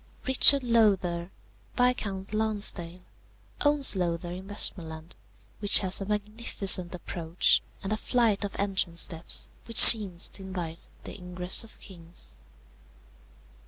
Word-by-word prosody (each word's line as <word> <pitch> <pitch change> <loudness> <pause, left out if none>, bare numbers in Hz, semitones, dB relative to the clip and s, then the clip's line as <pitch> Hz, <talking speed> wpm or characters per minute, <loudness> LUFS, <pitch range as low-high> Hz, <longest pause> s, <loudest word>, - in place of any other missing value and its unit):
"Richard 270 +1 +5
Lowther, 195 -7 -1 0.5
Viscount 215 -6 -3
Lonsdale, 205 -5 -3 0.6
owns 290 -5 +2
Lowther 175 -1 -5
in 185 +2 -11
Westmorland, 165 -5 -4 0.4
which 205 -1 +4
has 190 0 +1
a 195 - -7
magnificent 210 -4 +1
approach, 170 -1 -2 0.2
and 195 +2 -4
a - - -4
flight 225 -3 -2
of 200 - -7
entrance 190 -4 -3
steps 165 0 -2
which 230 - -10
seem 205 -6 +9
to 190 - -2
invite 175 -3 -7 0.2
the - - -11
ingress 180 +1 +1
of 225 - -17
kings. 170 - -10
190 Hz, 120 wpm, -25 LUFS, 175-215 Hz, 0.6 s, seem